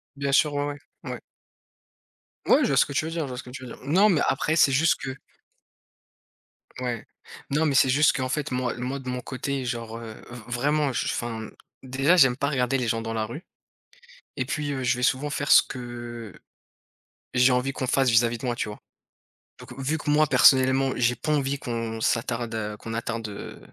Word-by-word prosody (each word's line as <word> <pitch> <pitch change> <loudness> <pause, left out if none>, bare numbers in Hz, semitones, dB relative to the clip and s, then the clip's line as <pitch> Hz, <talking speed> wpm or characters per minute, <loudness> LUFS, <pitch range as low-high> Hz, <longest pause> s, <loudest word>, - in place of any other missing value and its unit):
Bien 140 0 -2
sûr, 150 +1 +4
ouais, 145 0 0 0.4
ouais. - - -5
Ouais. - - -5 1.3
Ouais, - - +5
je - - +2
vois - - +1
ce - - +6
que 140 - -7
tu 155 - 0
veux 165 - -4
dire, 165 -1 -2
je - - -5
vois 125 - -6
ce 125 - -6
que 125 - -12
tu 130 0 -9
veux - - -8
dire. - - -10
Non, 185 +10 +4
mais 160 -6 +2
après, 155 +4 +1
c'est 140 -4 +5
juste 160 +5 +3
que 135 0 -5 1.6
Ouais. 120 -3 -3 0.4
Non, 150 +3 +1
mais 140 -3 +1
c'est 130 - +5
juste 145 +3 +4
qu'en 130 -1 -2
fait, 150 0 -2
moi, 125 -1 -1
le - - -10
moi 135 +2 -3
de 130 -1 -7
mon 125 0 -3
côté, 130 +1 -4
genre, 115 -2 -4
heu, 115 -2 -8 0.2
v 120 - -9
vraiment 140 +3 0
j - - -1
enfin, 115 -2 -4 0.3
déjà, 135 +7 +2
j'aime 130 -5 +5
pas 140 +1 0
regarder 135 -1 +1
les 125 -2 -2
gens 115 0 0
dans 115 0 -4
la 110 -1 -1
rue, 150 - -8 0.9
et - - -1
puis, 145 -2 -3
heu, 130 -1 -3
je 125 0 +1
vais 125 - -5
souvent 135 +3 +1
faire 145 0 -2
ce - - +9
que, 130 - -8 0.6
heu, - - -17 0.9
j'ai 125 +1 +5
envie 125 +2 0
qu'on 130 - -3
fasse 135 0 +2
vis-à-vis 115 +1 +3
de 125 - -6
moi, 120 - 0
tu - - -2
vois? 105 - -8 0.8
Donc - - -11
vu 145 +4 -1
que 150 - -4
moi 155 +1 +4
personnellement 130 0 +5
j'ai 125 0 +2
pas 155 - -3
envie 140 -1 0
qu'on 115 -2 -4
s'attarde, 115 -1 -1
heu, 105 -1 -4
qu'on 115 +1 -7
attarde, 115 -1 -3
heu 100 - -8
130 Hz, 220 wpm, -25 LUFS, 120-140 Hz, 1.6 s, ce